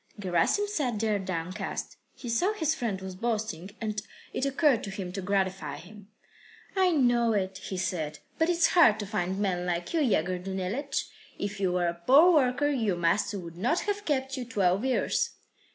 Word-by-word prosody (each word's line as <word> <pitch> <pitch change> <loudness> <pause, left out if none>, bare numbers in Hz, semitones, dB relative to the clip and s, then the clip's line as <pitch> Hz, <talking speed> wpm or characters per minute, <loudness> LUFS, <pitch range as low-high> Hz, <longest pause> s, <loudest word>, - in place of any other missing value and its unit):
Gerasim 195 - +2
sat 270 - -1
there 215 -2 +1
downcast. 185 +1 -4 0.2
He 245 - -9
saw 350 - +1
his 315 -7 0
friend 230 -10 -2
was 190 0 -6
boasting, 210 -4 -3
and 215 -2 -2 0.3
it 275 - 0
occurred 275 -3 +3
to - - -5
him 195 -2 -5
to 195 - -4
gratify 190 0 -1
him. 205 +2 -13 0.7
"I 375 -1 +4
know 240 -7 +3
it," 190 -2 -1
he 190 - -5
said. 170 -4 -2 0.2
"But 320 +1 +3
it's 340 -1 +3
hard 235 -12 +5
to - - -3
find 190 -2 -2
men 180 -3 -1
like 175 - -2
you, 330 - +2
Yegor 185 - +1
Danilych. 195 +9 -3 0.3
If 205 0 -4
you 190 -2 +1
were 180 -1 +1
a 170 - +1
poor 270 - +6
worker, 280 -1 +3
your 225 -10 0
master 190 +4 +1
would 170 -2 -8
not 250 - +1
have 410 0 -2
kept 265 -2 0
you 255 - -3
twelve 200 -5 +1
years." 260 -1 0
205 Hz, 185 wpm, -28 LUFS, 185-265 Hz, 0.7 s, poor